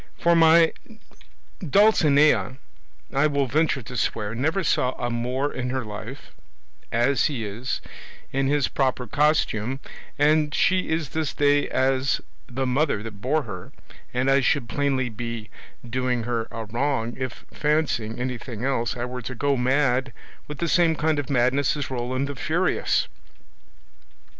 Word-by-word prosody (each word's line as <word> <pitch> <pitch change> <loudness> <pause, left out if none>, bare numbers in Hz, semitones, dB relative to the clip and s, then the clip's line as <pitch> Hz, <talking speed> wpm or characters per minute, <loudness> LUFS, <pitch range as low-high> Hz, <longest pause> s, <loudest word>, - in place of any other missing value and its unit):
For 170 0 +3
my 165 0 +6 0.9
Dulcinea, 150 - +4 0.6
I 140 +3 +3
will 140 -2 +1
venture 145 0 +1
to 125 +3 -9
swear, 105 -3 -1
never 160 +11 0
saw 130 -4 +1
a 120 -1 -3
Moor 125 +4 -1
in 125 -1 -3
her 130 -2 -2
life, 110 +6 -8 0.6
as 120 +4 +2
he 130 -7 -2
is, 110 +5 -4 0.5
in 135 0 0
his 145 -1 +2
proper 130 -2 0
costume, 135 -3 +1 0.4
and 150 0 +3
she 185 0 +2
is 160 -3 -1
this 160 0 -2
day 145 0 +3
as 130 0 +1 0.3
the 130 +2 -2
mother 130 -4 +1
that 105 -3 -9
bore 150 +5 +1
her, 95 -6 -9 0.4
and 125 +1 0
I 135 +1 +5
should 130 -1 +1
plainly 135 -2 0
be 115 -1 -6 0.4
doing 125 0 -1
her 115 -1 -2
a 115 -1 -6
wrong 120 +1 -1
if, 130 -3 -6
fancying 150 -7 0
anything 125 -1 -4
else, 120 -3 -1
I 120 - -2
were 125 0 -6
to 130 +2 -6
go 140 +3 +1
mad 130 0 +1 0.3
with 150 - -7
the 170 - -1
same 165 -1 +3
kind 155 0 +1
of 145 - -4
madness 130 +2 +2
as 140 -2 -4
Roland 130 +2 -2
the 145 - -5
Furious. 170 +7 0
130 Hz, 150 wpm, -24 LUFS, 120-145 Hz, 0.9 s, my